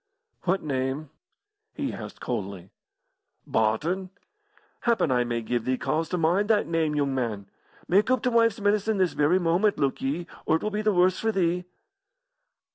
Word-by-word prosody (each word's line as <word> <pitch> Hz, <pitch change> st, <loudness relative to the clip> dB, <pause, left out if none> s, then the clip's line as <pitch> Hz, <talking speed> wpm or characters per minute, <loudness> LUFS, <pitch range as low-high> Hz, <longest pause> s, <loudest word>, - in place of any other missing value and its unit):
"What 190 Hz, +2 st, +1 dB
name?" 135 Hz, +1 st, -2 dB, 0.6 s
he -, -, -3 dB
asked -, -, -8 dB
coldly. 95 Hz, -1 st, -5 dB, 0.7 s
"Barton. 155 Hz, -, 0 dB, 0.7 s
Happen 230 Hz, -, +1 dB
I 125 Hz, -1 st, +3 dB
may 120 Hz, -1 st, -2 dB
give 120 Hz, 0 st, -1 dB
thee 130 Hz, +1 st, 0 dB
cause 160 Hz, +4 st, -1 dB
to 180 Hz, -, -1 dB
mind 180 Hz, +6 st, +2 dB
that 210 Hz, -2 st, +3 dB
name, 160 Hz, -2 st, 0 dB
yoong 140 Hz, -2 st, 0 dB
man. 115 Hz, -6 st, -2 dB, 0.4 s
Mak' 200 Hz, +6 st, +3 dB
oop 255 Hz, 0 st, +2 dB
t' 250 Hz, -, +2 dB
wife's 230 Hz, -1 st, +3 dB
medicine 205 Hz, +1 st, +1 dB
this 185 Hz, -2 st, +2 dB
very 150 Hz, +5 st, +3 dB
moment, 185 Hz, +4 st, +2 dB
look 140 Hz, -2 st, 0 dB
ye, 150 Hz, +6 st, -2 dB, 0.2 s
or -, -, +4 dB
it 160 Hz, -, -2 dB
will 215 Hz, -, -1 dB
be 210 Hz, +1 st, -1 dB
the 215 Hz, 0 st, +2 dB
worse 185 Hz, -1 st, +3 dB
for 225 Hz, -, +1 dB
thee." 180 Hz, -2 st, 0 dB
170 Hz, 170 wpm, -26 LUFS, 135-205 Hz, 0.7 s, or